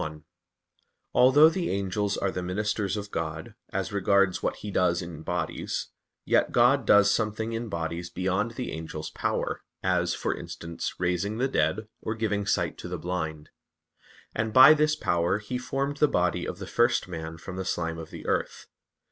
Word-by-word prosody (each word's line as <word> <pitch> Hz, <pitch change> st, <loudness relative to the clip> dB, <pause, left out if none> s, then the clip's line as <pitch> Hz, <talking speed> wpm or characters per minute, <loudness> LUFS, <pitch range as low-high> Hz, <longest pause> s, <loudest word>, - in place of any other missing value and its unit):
1: 75 Hz, 0 st, -6 dB, 0.9 s
Although 130 Hz, +5 st, +7 dB
the 175 Hz, +1 st, -2 dB
angels 100 Hz, +1 st, -1 dB
are 95 Hz, -, 0 dB
the 90 Hz, -, -3 dB
ministers 100 Hz, +2 st, -1 dB
of 100 Hz, -1 st, -6 dB
God, 80 Hz, -1 st, -4 dB, 0.2 s
as -, -, -3 dB
regards 100 Hz, -1 st, +2 dB
what -, -, -1 dB
He 105 Hz, -, -7 dB
does 90 Hz, -2 st, +2 dB
in 85 Hz, -3 st, -8 dB
bodies, 85 Hz, 0 st, -3 dB, 0.4 s
yet -, -, +3 dB
God -, -, +4 dB
does 105 Hz, 0 st, +6 dB
something 110 Hz, +1 st, -1 dB
in 115 Hz, 0 st, -3 dB
bodies 85 Hz, -1 st, -3 dB
beyond 95 Hz, +6 st, -1 dB
the 125 Hz, -1 st, -4 dB
angels' 80 Hz, -1 st, -6 dB
power, -, -, -2 dB, 0.2 s
as, -, -, +1 dB
for -, -, -1 dB
instance, 85 Hz, 0 st, -6 dB
raising 90 Hz, +4 st, -1 dB
the 130 Hz, +3 st, +1 dB
dead, 105 Hz, -, 0 dB
or 110 Hz, -, -3 dB
giving 105 Hz, -2 st, -1 dB
sight -, -, 0 dB
to -, -, -6 dB
the -, -, -4 dB
blind: 80 Hz, -4 st, -4 dB, 0.8 s
and 110 Hz, 0 st, -1 dB
by 130 Hz, +5 st, +10 dB
this 155 Hz, 0 st, +2 dB
power 85 Hz, -, +1 dB
He 110 Hz, +4 st, -4 dB
formed 135 Hz, +3 st, -2 dB
the 150 Hz, -, +4 dB
body 90 Hz, -7 st, 0 dB
of -, -, -5 dB
the -, -, -7 dB
first 120 Hz, -2 st, +2 dB
man 80 Hz, -2 st, -6 dB
from 90 Hz, +2 st, -8 dB
the 95 Hz, -, -2 dB
slime 85 Hz, -3 st, -2 dB
of 80 Hz, -1 st, -8 dB
the -, -, -10 dB
earth. -, -, -2 dB
100 Hz, 175 wpm, -27 LUFS, 85-110 Hz, 0.9 s, by